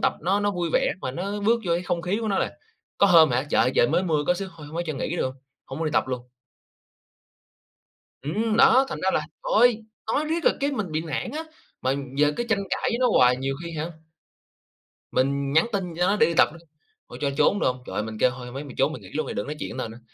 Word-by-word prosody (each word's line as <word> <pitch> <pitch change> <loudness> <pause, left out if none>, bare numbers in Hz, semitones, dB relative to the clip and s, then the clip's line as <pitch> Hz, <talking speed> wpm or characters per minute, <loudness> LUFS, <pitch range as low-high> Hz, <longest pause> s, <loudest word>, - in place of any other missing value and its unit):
tập - - +2
nó 195 +5 +2
nó 205 - +1
vui 175 -4 -2
vẻ - - +2
mà 130 - -3
nó 195 +8 -4
bước 230 +3 +2
vô 170 - +2
cái 175 - -1
không 170 -1 -2
khí 190 +5 -1
của 220 - -2
nó 195 - +1
là, - - -1 0.4
có 200 - +6
hôm 165 -5 +7
hả 125 +3 0
trời - - +4
ơi 130 - +1
trời 120 - +5
mới 170 +4 +2
mưa 155 -5 0
có 180 - +3
xíu, 195 +1 -5
"Thôi 150 - -10
hông 155 +3 -9
ấy 175 - -1
cho 155 - -2
nghỉ 155 +5 -3
được - - 0
hông?" 130 0 -3 0.3
Hông 135 - -7
muốn 165 - -1
đi 155 - -2
tập - - +1
luôn. 125 -1 -4 1.9
Ừm, 215 - -1
đó, 265 +1 +6
thành - - -4
ra - - +3
là - - +2 0.2
thôi, 245 - +3 0.3
nói 300 +2 +1
riết 325 +2 -2
là - - +6
cái 280 +1 0
mình 210 - -3
bị 155 +1 -1
nản 165 - -4
á, 310 +3 -4 0.4
mà 130 - +1 0.3
giờ 150 0 +4
cứ - - 0
tranh 220 -3 +2
cãi - - -1
với 235 - 0
nó 255 - +4
hoài 125 0 +5
nhiều 135 +1 -2
khi, 170 - -6
hả 160 +3 -3 1.2
mình 140 +1 0
nhắn 160 +2 +4
tin 180 -4 -2
cho 180 +1 +2
nó 205 - +2
để - - +5
đi 170 - -1
tập - - +7
đó. 170 - -12 0.5
"Thôi - - -9
cho 140 - +1
trốn 205 - +3
được - - +2
hông?" 125 0 -2
Trời, - - -2
mình 110 0 -6
kêu 125 - +5
"Thôi, 125 0 -9
hông 125 - -10
ấy 140 - -4
mày 140 - -10
trốn 135 +3 +2
mày - - -8
nghỉ - - -12
luôn 155 - -2
đi, - - -4
đừng - - -3
nói 150 - -4
chuyện - - -5
tao 130 - -3
nữa, 115 +2 -11
165 Hz, 275 wpm, -25 LUFS, 135-200 Hz, 1.9 s, hôm